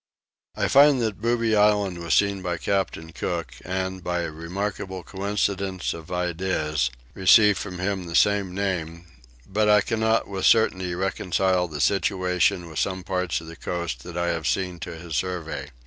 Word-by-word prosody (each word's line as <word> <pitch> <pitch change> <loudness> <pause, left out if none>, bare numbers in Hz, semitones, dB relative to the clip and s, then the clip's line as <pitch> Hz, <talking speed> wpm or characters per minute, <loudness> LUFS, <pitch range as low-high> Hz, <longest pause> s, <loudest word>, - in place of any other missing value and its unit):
I - - 0
find 140 -1 +6
that 105 -3 -3
Booby 115 -1 +1
island 105 -3 +3
was 85 0 +1
seen 100 -1 +2
by 90 -2 -2
Captain 85 -4 -2
Cook 85 -5 -3
and, 95 0 -3
by 90 0 -1
a 85 -2 -3
remarkable 95 +3 -4
coincidence 100 -1 -2
of 80 +1 -10
ideas, 85 -6 -1 0.2
received 100 +1 +5
from 95 -3 -6
him 95 0 -2
the 85 -1 -5
same 100 0 +3
name, 85 -4 -3 0.4
but 105 +2 +1
I 105 -1 +6
cannot 110 0 +1
with 95 -1 -3
certainty 95 -6 +3
reconcile 95 0 0
the 75 -3 -7
situation 90 0 +1
of 80 -3 -6
some 95 -1 -1
parts 90 -2 -1
of 80 - -12
the 80 - -9
coast 85 -10 -4
that 85 +3 -8
I 85 0 0
have 80 -3 -2
seen 90 +6 -1
to 85 -1 -6
his 80 -2 -6
survey. 85 -4 -3
95 Hz, 165 wpm, -24 LUFS, 85-100 Hz, 0.4 s, find